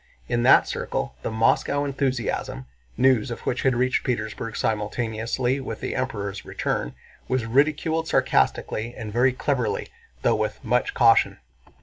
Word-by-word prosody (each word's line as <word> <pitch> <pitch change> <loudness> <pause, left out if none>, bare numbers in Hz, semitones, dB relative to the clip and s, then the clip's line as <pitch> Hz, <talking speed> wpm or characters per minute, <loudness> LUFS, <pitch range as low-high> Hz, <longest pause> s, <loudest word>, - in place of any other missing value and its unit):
In 120 - 0
that 125 - +6
circle - - -3
the - - -3
Moscow 115 +6 +2
enthusiasm—news 120 - -1
of 120 - -6
which 125 - -2
had 130 -2 +2
reached 130 +1 +1
Petersburg 115 -2 -3
simultaneously 110 +4 -1
with 135 - -6
the - - -3
Emperor's 100 -6 -3
return—was 65 - -4
ridiculed 150 +6 +1
sarcastically 110 - +1
and 105 -2 -6
very 125 +3 +4
cleverly, 130 -1 -1 0.3
though - - +4
with 110 0 -2
much 125 +1 0
caution. 115 -1 +4
120 Hz, 125 wpm, -24 LUFS, 110-130 Hz, 0.3 s, that